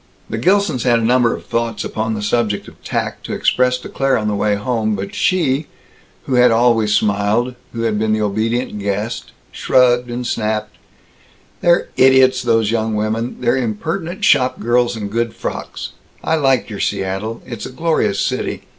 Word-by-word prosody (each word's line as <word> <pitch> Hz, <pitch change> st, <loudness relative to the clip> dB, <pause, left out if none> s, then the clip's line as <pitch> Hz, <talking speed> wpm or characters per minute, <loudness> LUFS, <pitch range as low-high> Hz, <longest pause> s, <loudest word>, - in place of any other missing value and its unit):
The 110 Hz, -, -2 dB
Gilsons 180 Hz, -, +2 dB
had 120 Hz, -1 st, +3 dB
a 115 Hz, -, -1 dB
number 120 Hz, 0 st, +3 dB
of -, -, -11 dB
thoughts 115 Hz, -2 st, -2 dB
upon 110 Hz, 0 st, -2 dB
the 105 Hz, -, -4 dB
subject 105 Hz, -1 st, 0 dB
of -, -, -16 dB
tact -, -, -3 dB
to -, -, -4 dB
express 125 Hz, 0 st, +2 dB
to 125 Hz, -, -10 dB
Claire 135 Hz, 0 st, +1 dB
on 105 Hz, -, -2 dB
the 105 Hz, -, 0 dB
way 105 Hz, 0 st, +1 dB
home. 110 Hz, 0 st, -1 dB
But 100 Hz, 0 st, -5 dB
she, 155 Hz, -5 st, +1 dB, 0.6 s
who 135 Hz, -, -3 dB
had 125 Hz, 0 st, +6 dB
always 115 Hz, -2 st, +3 dB
smiled, 105 Hz, +4 st, +1 dB, 0.2 s
who 115 Hz, -, -5 dB
had 110 Hz, -2 st, 0 dB
been 110 Hz, 0 st, 0 dB
the 110 Hz, 0 st, +1 dB
obedient 110 Hz, +2 st, -1 dB
guest, 105 Hz, +3 st, -3 dB, 0.2 s
shrugged 125 Hz, -1 st, +2 dB
and 120 Hz, +1 st, -4 dB
snapped, 110 Hz, -2 st, -2 dB, 0.9 s
"They're 175 Hz, 0 st, +3 dB
idiots, 130 Hz, -1 st, +5 dB
those 115 Hz, -3 st, +2 dB
young 110 Hz, -1 st, 0 dB
women. 110 Hz, +3 st, -2 dB
They're 120 Hz, 0 st, +2 dB
impertinent 160 Hz, -, -3 dB
shopgirls 125 Hz, -2 st, +2 dB
in 105 Hz, -2 st, -4 dB
good 115 Hz, +1 st, -2 dB
frocks. -, -, -5 dB, 0.3 s
I -, -, 0 dB
like 135 Hz, -5 st, +2 dB
your 105 Hz, -3 st, -7 dB
Seattle. 95 Hz, +4 st, -2 dB
It's 120 Hz, -4 st, -6 dB
a -, -, -10 dB
glorious 130 Hz, -9 st, 0 dB
city. -, -, -2 dB
115 Hz, 175 wpm, -18 LUFS, 110-125 Hz, 0.9 s, had